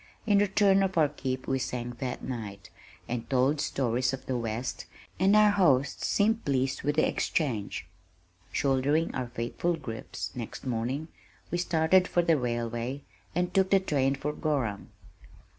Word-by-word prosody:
In 205 -3 +4
return 195 -1 +4
for 170 -3 +1
our 150 - +4
"keep" 130 -3 -4
we 135 0 +1
sang 120 -1 -3
that 130 -2 -4
night, 100 -7 -6 0.4
and 115 -1 -4
told 135 +3 +2
stories 125 -1 0
of 130 0 -6
the 130 - -2
west, 115 +1 -3 0.3
and 195 +3 +5
our 210 -1 +6
hosts 140 -9 +2
seemed 220 +2 +2
pleased 135 -1 0
with 145 +1 0
the 155 - +3
exchange. 120 -11 -1 0.7
Shouldering 140 +4 +1
our 130 -1 -2
faithful 120 +9 -2
"grips" 115 -8 -6
next 120 +2 -6
morning, 130 +6 -2 0.4
we 175 - 0
started 175 +2 +3
for 175 - +2
the 165 -1 +4
railway 120 +1 -2 0.3
and 180 +1 0
took 190 -1 +3
the 195 - +5
train 140 -7 +1
for 150 +2 -3
Gorham. 135 -11 -2
135 Hz, 155 wpm, -29 LUFS, 125-170 Hz, 0.7 s, our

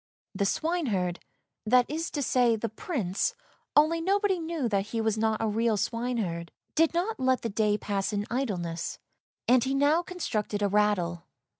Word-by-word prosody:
The 200 - 0
swineherd 220 - 0 0.3
— - - -58
that 250 +2 +5
is 320 +3 -3
to 290 - -2
say, 245 -3 +3
the 225 +1 -3
Prince, 220 - -2 0.4
only 315 +3 +4
nobody 390 +1 +2
knew 325 -5 -2
that 200 -2 0
he 225 +1 -3
was 220 -1 +1
not 220 0 +1
a 225 - 0
real 220 +1 +1
swineherd 220 -7 -2
— - - -50
did 325 +1 +3
not 370 +4 -1
let 260 0 +2
the 230 - -1
day 210 0 +1
pass 200 -1 -2
in 205 0 -1
idleness, 180 -10 -2 0.5
and 250 -1 +5
he 270 +1 0
now 290 +4 +4
constructed 215 - -3
a - - +4
rattle. 190 -4 +1
230 Hz, 175 wpm, -28 LUFS, 205-295 Hz, 0.5 s, that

